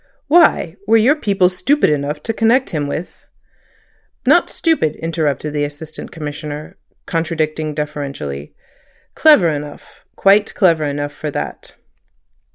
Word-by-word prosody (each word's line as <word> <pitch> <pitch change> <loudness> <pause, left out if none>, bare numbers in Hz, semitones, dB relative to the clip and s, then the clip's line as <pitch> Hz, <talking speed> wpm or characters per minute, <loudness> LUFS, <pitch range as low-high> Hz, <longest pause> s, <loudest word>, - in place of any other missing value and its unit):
"Why? 295 - +3
Were 225 +1 +5
your 245 +7 +4
people 200 -10 +2
stupid 185 - +1
enough 150 +1 -2
to 225 - -2
connect 235 +3 +2
him 150 -4 -2
with—" 155 +5 -6 1.0
"Not - - +4
stupid," 315 - 0
interrupted 155 -3 -2
the 145 -1 0
Assistant 150 +2 -7
Commissioner, 150 -1 -7 0.3
contradicting 155 -2 -2
deferentially. 140 - -5 0.6
"Clever 295 - +5
enough—quite 175 +7 -1
clever 165 -6 +3
enough 145 0 -3
for 150 +1 -5
that." - - -6
155 Hz, 115 wpm, -18 LUFS, 145-195 Hz, 1.0 s, Were